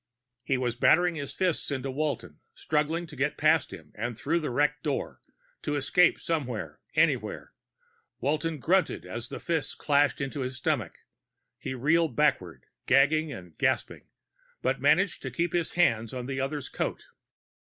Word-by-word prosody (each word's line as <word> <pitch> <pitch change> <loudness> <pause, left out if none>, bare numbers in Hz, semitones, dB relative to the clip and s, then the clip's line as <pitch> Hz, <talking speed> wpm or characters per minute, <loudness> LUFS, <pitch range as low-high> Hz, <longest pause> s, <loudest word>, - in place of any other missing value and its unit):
He 135 +1 0
was 120 -2 -1
battering 175 +7 +4
his 145 -4 -5
fists 185 -4 0
into 135 -1 -2
Walton, 145 -1 -3 0.2
struggling 155 +3 0
to 155 - -12
get 145 +3 -1
past 155 -1 +3
him 75 -2 -11
and 115 +1 -4
through 165 +7 0
the 155 - -3
wrecked 145 +3 +1
door, 145 -2 -3 0.4
to 150 - -2
escape 145 +5 +3
somewhere, 125 - -3 0.2
anywhere. - - +1 0.7
Walton 155 +4 0
grunted 180 +7 +1
as 120 +1 -6
a - - -5
fist 165 -4 -1
crashed 145 -1 +2
into 140 +1 -3
his 130 0 -3
stomach. - - -1 0.6
He 130 - -4
reeled 155 +2 +2
backward, 90 - +1 0.2
gagging 150 +4 +4
and 90 - -10
gasping, - - 0 0.6
but 130 +1 0
managed 160 +6 +3
to - - -4
keep 170 0 -1
his 175 -2 0
hand 115 -9 +2
on 125 -1 -4
the 135 0 -3
other's 140 +1 -3
coat. - - -3
145 Hz, 155 wpm, -28 LUFS, 130-160 Hz, 0.7 s, battering